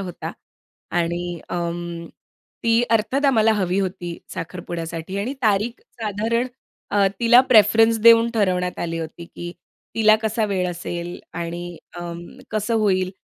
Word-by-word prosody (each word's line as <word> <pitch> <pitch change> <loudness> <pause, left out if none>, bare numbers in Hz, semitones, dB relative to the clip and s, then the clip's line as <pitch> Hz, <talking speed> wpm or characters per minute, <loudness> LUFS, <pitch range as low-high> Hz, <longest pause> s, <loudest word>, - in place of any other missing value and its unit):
होता. 180 -3 -5 0.6
आणि 175 0 -1
अं, 170 -1 -4 0.6
ती 230 +1 +3
अर्थात 230 +6 +1
आम्हाला 225 -5 +4
हवी 190 -3 0
होती 180 -3 -4 0.2
साखरपुड्यासाठी. 170 +1 -5
आणि 235 +7 -2
तारीख 215 +2 +1 0.2
साधारण 225 +3 0 0.5
अ, 200 -1 +4
तिला 240 +1 +7
प्रेफरन्स 225 0 +6
देऊन 230 0 +7
ठरवण्यात 180 -4 0
आली 165 -1 -3
होती, 165 +1 -6
की 175 +1 -8 0.4
तिला 215 -1 +6
कसा 220 0 0
वेळ 190 -3 0
असेल 175 0 -5
आणि 170 +1 -5 0.2
अ, - - -5 0.5
कसं 215 +2 -1
होईल. 190 -4 +2
195 Hz, 125 wpm, -22 LUFS, 175-225 Hz, 0.6 s, तिला